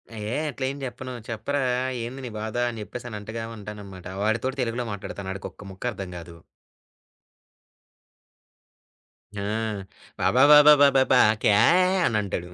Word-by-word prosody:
ఆహ్, - - -7
ఏయ్! 150 - -1
అట్లా 135 - -4
ఎం 140 - -8
చెప్పను 130 0 -6 0.2
చెప్పరా 140 +5 -2 0.4
ఏంది 125 +3 -6
నీ - - -5
బాధ 110 +1 -5
అని 115 -2 -7
చెప్పేసనంటగా 115 -1 -7
ఉంటాననమాట. 100 -3 -10 0.2
వాడితోటి 115 +5 -1
తెలుగులో 120 0 -2
మాట్లాడతాను. 100 -1 -6
ఆడికొక్క 100 +1 -9
ముక్కర్థం 95 -2 -5
కాదు. 85 0 -12 3.0
ఆ! 100 - -4 0.8
బాబాబాబాబాబా 140 -1 +6 0.2
"క్యాహే" 175 - +4
అనంటాడు. 100 -5 -2
115 Hz, 105 wpm, -25 LUFS, 105-130 Hz, 3.0 s, బాబాబాబాబాబా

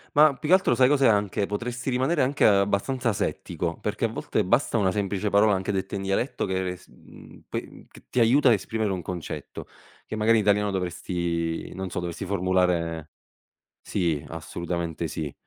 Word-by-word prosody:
Ma 150 0 +6
più 150 - -6
che 180 - +7
altro, 185 -10 +3
sai 125 +1 +5
cos'è 140 -1 +4
anche? 105 -1 +2
Potresti 120 +4 -3
rimanere 130 +6 +1
anche 135 +3 +1
abbastanza 105 +5 +2
asettico, 85 -4 -3
perché 105 +2 -1
a - - -3
volte, 110 -1 -1
basta 120 +4 +2
una 95 -2 +2
semplice 100 0 -1
parola, 105 +1 +4
anche 95 +1 -2
detta 95 +1 -2
in 95 - -4
dialetto, 100 +7 -1
che 95 0 -1
re 90 0 -3
s - - -20
mhmm, - - -16
pe - - -3
mhmm, - - -14
c - - -16
ti - - -2
aiuta 130 +5 +5
a - - +7
esprimere 110 +1 -2
un 95 -2 -3
concetto, 85 0 -6 0.4
che, - - -5
magari, 110 +1 +4
in 105 - 0
italiano, 105 0 +3
dovresti 85 -3 -2
non 95 0 -5
so, - - -4
dovresti 85 -1 -5
formulare 90 -4 0 0.7
sì, 85 -7 -1
assolutamente, 85 0 -4
sì. 75 -2 -5
100 Hz, 185 wpm, -25 LUFS, 90-115 Hz, 0.7 s, che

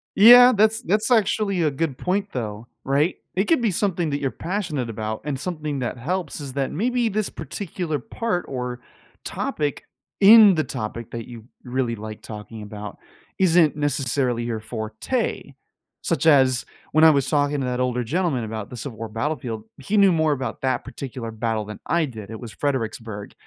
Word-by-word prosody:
Yeah, 245 +4 +9
that's 220 +2 +3
that's 215 0 +1
actually 210 -5 +2
a 155 - +2
good 140 -1 -2
point, 195 +3 -1
though, 110 -1 -5 0.2
right? 145 +6 +1 0.2
It 190 +3 +2
could 320 -2 +2
be 225 - +2
something 180 -3 0
that 140 0 -1
you're 140 -2 0
passionate 165 - -3
about, 110 0 -4
and 140 -2 -3
something 155 -5 -3
that 125 0 -3
helps 165 +5 -3
is 135 -2 -7
that 135 -1 -1
maybe 240 +6 0
this 215 -1 -1
particular 175 -5 -4
part 195 - -2
or 125 -1 -4 0.4
topic 145 -1 -3 0.3
in 205 -1 +9
the 155 - +1
topic 115 -1 -5
that 115 -1 -6
you 120 -1 -8 0.3
r 125 - -9
really 125 -2 0
like 110 0 -8
talking 110 0 -9
about 105 0 -8 0.4
isn't, 170 -5 +4
necessarily, 130 -4 0
your 115 -2 -3
forte. 110 - -3 0.5
Such - - 0
as, 130 -5 +5 0.3
when 155 - +5
I 160 - +9
was 140 -3 +1
talking 145 -1 +1
to - - -1
that 125 0 -2
older 125 -1 0
gentleman 145 -1 0
about 110 -2 -5
the 125 - -7
Civil 120 -1 -7
War 115 - -5
battlefield, 115 -1 -3
he 195 +10 -1
knew 195 -2 +6
more 160 -2 +2
about 135 -2 -3
that 130 -2 0
particular 125 -4 -7
battle 110 -1 -2
than 105 0 -8
I 170 -2 +2
did, 110 -5 -9
it 110 - -7
was 120 -3 -8
Fredericksburg, 115 -7 -3
140 Hz, 180 wpm, -23 LUFS, 115-180 Hz, 0.5 s, Yeah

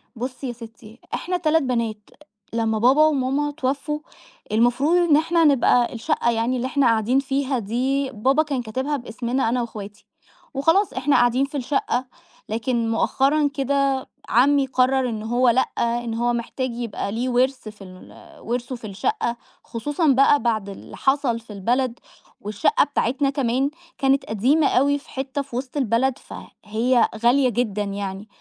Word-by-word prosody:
بُصي 255 +3 -5
يا 245 - -4
ستِّي، 230 -1 -13
إحنا 360 +1 -2
3 320 -2 +2
بنات، 230 -5 -2 0.4
لمَّا 225 -1 0
بابا 265 +7 +5
وماما 290 0 0
توفُّوا، 285 +1 -2 0.5
المفروض 245 +9 +3
إن 295 - +6
إحنا 330 +2 +2
نبقى 255 -4 +3
الشقَّة 235 0 0
يعني 230 +2 0
اللي 250 +1 -2
إحنا 275 +1 +1
قاعدين 230 +3 +2
فيها 275 -1 -1
دي، 260 +6 -1
بابا 265 +8 +2
كان 280 -5 -2
كاتِبها 260 +6 -2
باسمنا 240 0 -2
أنا 245 +1 0
وإخواتي 210 -3 -8 0.5
وخلاص، 325 +7 +2
إحنا 270 +2 +1
قاعدين 245 +3 +3
في 285 +1 -6
الشقَّة. 260 -1 -1 0.4
لكن 230 +1 -1
مؤخَّرًا 280 +6 +2
كده، 275 -1 0 0.2
عمِّي 275 +3 +4
قرَّر 260 0 +2
إن 220 -2 -5
هو، 240 +3 +2
لأ، 245 +3 +4 0.2
إن 235 0 -1
هو 240 +1 0
محتاج 245 +2 -3
يبقى 230 -4 -4
ليه 240 +4 -2
ورث 255 -1 0
في 210 -1 -13
ال 185 -1 -13 0.3
ورثه 245 +2 -3
في 230 -3 -9
الشقَّة، 240 - -2 0.3
خصوصًا 290 +8 -2
بقى 275 +1 +5
بعد 220 -4 -1
اللي 195 - -10
حصل 270 -4 +1
في 225 -2 -12
البلد، 240 +5 -1 0.4
والشقَّة 205 0 +2
بتاعتنا 275 0 0
كمان 270 -1 0 0.3
كانت 270 +1 +2
قديمة 265 +8 +2
أوي 285 +2 +2
في - - -21
حتَّة 265 +1 -3
في 275 -3 -9
وسط 255 +3 -4
البلد، 260 +1 +1
فهي 235 0 -1
غالية 255 +2 +4
جدًا 210 -3 -1
يعني. 200 0 -5
255 Hz, 155 wpm, -22 LUFS, 230-275 Hz, 0.5 s, إن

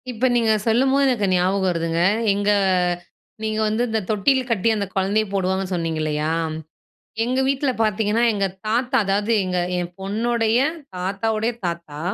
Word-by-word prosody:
இப்ப 245 +1 -1
நீங்க 230 -2 +3 0.2
சொல்லும்போது, 265 +5 +3
எனக்கு 240 -6 +1
ஞாபகம் 190 +2 +1
வருதுங்க. 165 -1 -1 0.3
எங்க 205 +1 +1 0.9
நீங்க 215 0 -1
வந்து, 220 +3 0
இந்த 220 0 0
தொட்டில் 250 +5 +2
கட்டி, 230 0 +2
அந்த 205 -1 -1
குழந்தைய 200 +3 +1
போடுவாங்கன்னு 190 0 -1
சொன்னீங்க 165 -2 -2
இல்லையா! 150 0 -1 0.9
எங்க 255 +2 0
வீட்டில 275 0 +1
பார்த்தீங்கன்னா, 215 +1 +1
எங்க 200 -2 0 0.2
தாத்தா, 245 +4 +1
அதாது 205 +3 0
எங்க 180 -1 -1 0.2
என் 175 -1 -3
பொண்ணுடைய 225 +3 0 0.4
தாத்தாவுடைய 215 +5 -1
தாத்தா. 170 -4 -5
210 Hz, 140 wpm, -22 LUFS, 185-230 Hz, 0.9 s, நீங்க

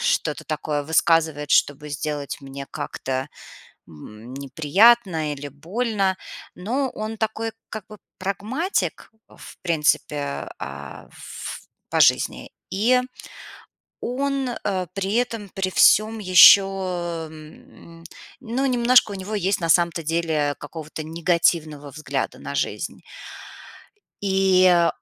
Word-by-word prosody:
что-то 485 0 0
такое 150 -1 -2
высказывает, 160 -1 +1
чтобы 145 +1 +2
сделать 145 -1 -4
мне 135 0 -8
как-то, 135 -3 -4 0.6
м, 105 - -12
неприятно 160 - +3
или 145 0 -6
больно. 190 - -1 0.4
Но 250 +8 -2
он 215 +1 -5
такой, 220 +1 -2 0.2
как 215 -3 -7
бы, 215 - -12 0.2
прагматик, 210 - -2 0.2
в - - -14
принципе, 150 -3 0
а, - - -8
ф - - -8 0.3
по - - 0
жизни. - - +3 0.2
И 235 +6 +3 1.0
он, 270 +1 -1
э, 190 -6 -3
при 195 +1 -2
этом 230 -4 -1
при 190 0 -3
всём 215 +4 +4
еще, 185 0 +9 0.7
м, 160 +2 -14 0.4
ну, 260 +1 -2
немножко 245 -3 +4
у - - -5
него 195 +3 -6
есть, 195 -1 0
на 165 - -1
самом-то 170 0 +3
деле, 155 -2 0
какого-то 155 +1 -8
негативного 160 -2 0
взгляда 155 +2 -4
на - - -7
жизнь. - - -3 1.2
И 185 -3 +4
180 Hz, 110 wpm, -23 LUFS, 150-215 Hz, 1.2 s, еще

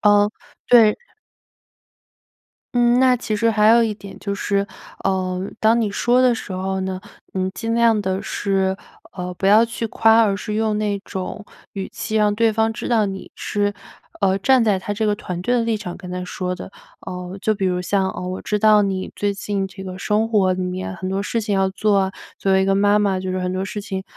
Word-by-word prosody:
嗯， 205 0 +4 0.4
对 225 -3 +6 1.8
嗯， 240 0 +4
那 255 -1 +5
其 225 -3 -3
实 230 +2 +2
还 215 -1 +3
有 235 +1 +6
一 220 -2 0
点 200 -1 -11
就 200 -1 -3
是， 200 0 -1 0.4
呃， 185 -1 0 0.2
当 225 +2 +4
你 220 -3 0
说 240 +5 +2
的 250 -2 +4
时 215 - -7
候 190 +1 -2
呢 185 0 -3 0.3
你 185 0 -1
尽 225 +3 -3
量 230 -2 +3
地 190 0 -2
是， 190 -1 0 0.4
呃， 180 -1 -5
不 190 - -4
要 215 +3 +7
去 230 0 -3
夸， 225 +1 +4
而 200 -3 +1
是 210 +1 -5
用 215 -1 0
那 205 -1 -1
种 195 +2 -6 0.3
语 195 -1 -4
气 215 - -4
让 210 -1 +2
对 225 +1 +3
方 220 +1 +1
知 - - -5
道 225 -3 +3
你 195 -1 -6
是， 205 0 -1 0.5
呃， 195 -1 +2
站 260 +4 +4
在 210 -3 +2
她 205 +2 -4
这 220 +1 -1
个 210 -1 +2
团 180 -3 -5
队 245 +7 +1
的 240 - +2
立 230 -1 0
场 180 -4 -6
跟 180 -1 -9
她 180 0 -4
说 180 0 -3
的。 190 - -9 0.3
呃， 180 +1 -6
就 215 +1 +1
比 195 -1 -1
如 180 -1 0
像， 190 +1 0
呃， - - -7
我 185 0 -4
知 210 - -1
道 215 0 +6
你 190 -2 -2
最 205 0 0
近 200 -1 -2
这 190 0 -11
个 185 -1 -7
生 210 +3 +1
活 205 -5 +3
里 185 - -3
面 185 0 -3
很 185 +1 -5
多 195 +1 -1
事 230 - -1
情 210 -2 -1
要 190 0 +2
做 200 +1 +1
啊， 190 -1 +1 0.3
作 195 - 0
为 190 0 +4
一 - - 0
个 195 0 +2
妈 205 +1 +4
妈 200 -2 +1
就 185 0 -3
是 185 - -2
很 180 0 -2
多 185 +1 -2
事 195 +2 -5
情 190 -1 -5
200 Hz, 240 characters per minute, -21 LUFS, 190-220 Hz, 1.8 s, 要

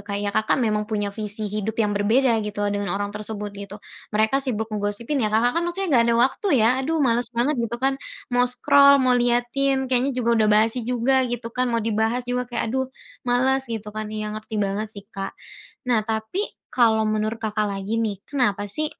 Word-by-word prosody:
kayak, 205 0 -3
Kakak 215 +1 +2
memang 210 -1 -1
punya 205 -2 -2
visi 215 0 -3
hidup 210 +1 -3
yang 210 -2 +1
berbeda 225 +4 +2
gitu 210 -1 -3
dengan 205 0 -2
orang 205 0 -3
tersebut 210 -1 -6
gitu. 200 0 -8 0.4
Mereka 220 +6 +3
sibuk 225 -5 -3
ngegosipin, 210 +7 -2
ya, 215 - +1
Kakak, 240 +8 +2
kan, - - -2
maksudnya 380 +2 -2
nggak 235 -3 +5
ada 235 - +3
waktu, 270 +10 -2
ya, 225 -2 +4
"Aduh, 310 +2 0
males 235 -1 +1
banget," 250 +2 +1
gitu, 235 0 -2
kan. 270 +2 0 0.3
Mau 245 0 +3
scroll, 280 +3 +5
mau 260 -2 +3
liatin, 250 +2 +1
kayaknya 255 +1 +1
juga 235 -2 +2
udah 215 - +3
basi 225 +2 +1
juga, 250 +2 +3
gitu 235 -1 -4
kan, 250 +1 0
mau 230 -2 -1
dibahas 225 +2 0
juga 245 0 -2
kayak, 235 -2 -2
"Aduh 260 0 -1 0.4
males," 260 +2 +2
gitu, 215 -2 -5
kan. 215 0 -4
Iya, 215 0 -4
ngerti 215 +1 -6
banget 205 +1 -1
sih, 200 -2 -11
Kak. 195 0 -5 0.5
Nah, 245 -3 +2
tapi, 220 - -2 0.2
kalau 225 -3 +3
menurut 215 +1 -2
Kakak 215 -1 0
lagi, 200 +2 -3
nih. 210 -4 -2
Kenapa 240 -8 0
sih, 310 +9 -1
225 Hz, 195 wpm, -23 LUFS, 210-250 Hz, 0.5 s, nggak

